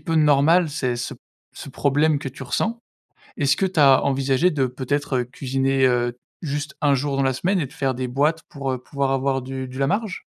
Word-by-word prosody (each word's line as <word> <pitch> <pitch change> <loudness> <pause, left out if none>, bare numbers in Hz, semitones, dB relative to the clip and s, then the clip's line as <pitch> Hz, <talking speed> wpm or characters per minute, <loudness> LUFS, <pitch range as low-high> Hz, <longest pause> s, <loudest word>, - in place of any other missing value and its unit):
peu 165 - -3
normal, 155 +2 +4
ces 130 -5 -2
ce 120 - -4 0.4
ce - - -9
problème 145 +3 +1
que 140 - -5
tu 135 - -10
ressens. 230 - -1 0.6
Est-ce 140 -2 +2
que 195 - +1
tu 185 -3 -4
as 135 -2 +6
envisagé 135 +4 +2
de, 140 -5 0
peut-être, 135 +2 -2
heu, 125 - 0
cuisiner, 135 +1 0
heu, 120 -1 +1 0.2
juste 145 -2 -4
1 145 -2 +3
jour 140 +1 -1
dans - - +2
la 130 -1 +1
semaine 185 +7 0
et 145 - -1
de 130 - -16
faire 135 -2 -1
des 125 +1 -3
boîtes 150 +6 +1
pour, 135 -2 -4
heu, 130 - -3
pouvoir 140 0 -2
avoir 135 0 0
du 130 0 -5
du 130 +1 -9
la 135 - +2
marge? 205 +4 -2
140 Hz, 220 wpm, -22 LUFS, 130-150 Hz, 0.6 s, as